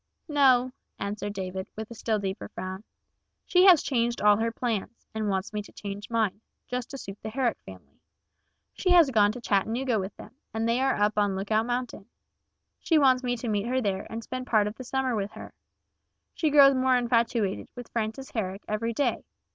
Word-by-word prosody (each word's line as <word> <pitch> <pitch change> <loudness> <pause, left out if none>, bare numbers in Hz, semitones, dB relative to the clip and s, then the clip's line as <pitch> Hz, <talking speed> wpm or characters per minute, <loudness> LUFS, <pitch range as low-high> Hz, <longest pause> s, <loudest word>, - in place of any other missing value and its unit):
"No," 260 -4 +4 0.3
answered 205 0 -4
David, 190 -1 -5
with 220 +1 -7
a - - -5
still 220 -1 -1
deeper 195 0 -4
frown. 185 +2 -6 0.6
"She 360 +1 +4
has 360 -6 +7
changed 240 -3 0
all 210 0 +5
her 230 +1 0
plans, 230 -1 -3
and 215 -1 -2
wants 195 +2 -2
me 210 - -2
to 205 - -14
change 205 0 -7
mine, 220 -3 0 0.3
just 250 -1 -4
to 275 - -7
suit 195 -5 -9
the - - -5
Herrick 250 +1 -1
family. - - -13 0.7
She 370 - -1
has 335 -6 +6
gone 210 -3 +4
to 245 - -7
Chattanooga 230 +3 0
with 190 +1 -6
them, - - -12 0.2
and 225 +1 0
they 235 +2 +2
are 270 0 +2
up 210 0 +1
on 205 -2 +1
Lookout 215 +4 0
Mountain. 245 -4 -3 0.7
She 325 - +2
wants 260 -3 +4
me 245 -1 -1
to 235 - -5
meet 210 0 0
her 255 +1 +1
there 200 -5 -2
and 225 +1 -5
spend 255 +2 -6
part 215 -3 +3
of 210 - -3
the 255 - -9
summer 260 -1 -1
with 205 0 -3
her. - - -10 0.8
She 315 - 0
grows 280 -1 +7
more 260 -1 +3
infatuated 235 -4 0
with 245 -1 -9
Frances 230 +4 -3
Herrick 195 -3 -3
every 230 +2 -2
day. 280 +5 0
230 Hz, 195 wpm, -27 LUFS, 205-255 Hz, 0.8 s, has